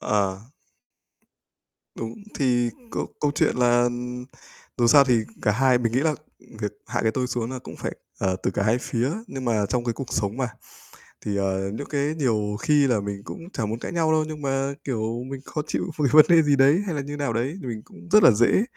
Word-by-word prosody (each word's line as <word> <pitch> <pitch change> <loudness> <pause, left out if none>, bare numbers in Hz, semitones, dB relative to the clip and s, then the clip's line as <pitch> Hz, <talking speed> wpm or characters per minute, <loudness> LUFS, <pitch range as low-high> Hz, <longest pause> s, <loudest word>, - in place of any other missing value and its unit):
Ờ. 100 -2 0 1.6
Đúng. 115 0 -5 0.2
Thì 120 -3 +2 0.2
câu - - -2
câu 145 - +2
chuyện - - +2
là, 120 -1 +4
ừm, 125 0 -3 0.5
dù 120 - +3
sao 140 +3 +7
thì 125 -2 +3 0.3
cả 105 - +3
hai 130 +2 +3
mình 115 -2 -1
nghĩ 125 - +2
là 155 +1 +2 0.5
việc 105 -1 -2
hạ - - -1
cái 110 - +3
tôi 125 +2 -1
xuống 120 -2 -3
là 130 - -4
cũng - - -10
phải, - - -4 0.3
ờ, 95 -1 0
từ - - +1
cả 100 - -1
hai 110 +4 +2
phía. 125 0 -1 0.2
Nhưng 135 -8 -6
mà 110 -4 +1
trong 120 +3 -1
cái 120 - 0
cuộc 130 +2 -7
sống 100 +1 -1
mà, 130 -2 -1 0.8
thì, 100 -1 -1
ờ, 95 0 -1
những 130 +6 -5
cái 145 +1 0
nhiều 110 -8 0
khi 150 -3 +3
là 120 -5 +2
mình 100 0 -5
cũng 170 - -9
chả 110 - -1
muốn 110 +2 -3
cãi - - -5
nhau 165 -2 +1
đâu, 155 0 +3
nhưng 155 -1 -7
mà, 135 0 -1
kiểu, 115 -2 -2
mình 135 -1 -6
khó 150 - -3
chịu 180 - -2
về 145 -4 +2
vấn 155 0 +9
đề 170 -1 +7
gì 145 -2 +3
đấy 140 +7 +5
hay 175 -6 -2
là 145 - -1
như 145 +1 -6
nào 140 -5 -1
đấy, 130 +9 -2
thì - - -7
mình 110 -3 -4
cũng - - -15
rất 210 +1 +7
là - - +9
dễ 120 - +3
125 Hz, 230 wpm, -24 LUFS, 110-145 Hz, 1.6 s, vấn